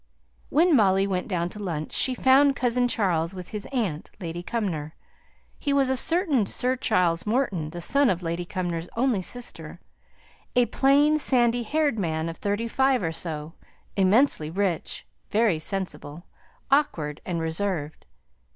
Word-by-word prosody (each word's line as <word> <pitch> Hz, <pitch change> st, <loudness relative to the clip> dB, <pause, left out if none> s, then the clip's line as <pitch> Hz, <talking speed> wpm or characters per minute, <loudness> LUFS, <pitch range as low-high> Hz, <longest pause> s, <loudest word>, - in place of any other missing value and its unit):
When 330 Hz, +1 st, +4 dB
Molly 195 Hz, -4 st, +4 dB
went 185 Hz, -2 st, -2 dB
down 175 Hz, -3 st, -1 dB
to 210 Hz, -, -9 dB
lunch 155 Hz, -5 st, -4 dB
she 255 Hz, -, +3 dB
found 275 Hz, +2 st, +4 dB
"cousin 245 Hz, -1 st, +1 dB
Charles," 180 Hz, -6 st, 0 dB
with 180 Hz, -1 st, -8 dB
his 210 Hz, -2 st, -4 dB
aunt, 210 Hz, -, -3 dB
Lady 170 Hz, -2 st, -5 dB
Cumnor. 175 Hz, -7 st, -3 dB, 0.6 s
He 285 Hz, -, 0 dB
was 270 Hz, -2 st, +2 dB
a -, -, +1 dB
certain 300 Hz, -, +2 dB
Sir 255 Hz, +1 st, 0 dB
Charles 180 Hz, -8 st, +1 dB
Morton, 210 Hz, -, 0 dB
the 175 Hz, +2 st, -7 dB
son 280 Hz, +7 st, +3 dB
of 180 Hz, -1 st, -1 dB
Lady 170 Hz, +1 st, -2 dB
Cumnor's 175 Hz, -2 st, -4 dB
only 240 Hz, -5 st, +1 dB
sister: 175 Hz, -7 st, -6 dB, 0.8 s
a 245 Hz, -1 st, +5 dB
plain, 285 Hz, +6 st, +3 dB
sandy 240 Hz, -4 st, +4 dB
haired 285 Hz, 0 st, 0 dB
man 160 Hz, -3 st, -2 dB
of 165 Hz, -, -7 dB
thirty 205 Hz, +3 st, -2 dB
five 265 Hz, -1 st, +1 dB
or 165 Hz, -, -1 dB
so; 160 Hz, -1 st, -5 dB, 0.4 s
immensely 195 Hz, -, +3 dB
rich, 180 Hz, -2 st, -2 dB, 0.2 s
very 210 Hz, -6 st, +2 dB
sensible, 160 Hz, -3 st, -3 dB, 0.5 s
awkward, 160 Hz, -, +1 dB
and 175 Hz, -2 st, -3 dB
reserved. 160 Hz, -2 st, -3 dB
200 Hz, 150 wpm, -25 LUFS, 165-250 Hz, 0.8 s, a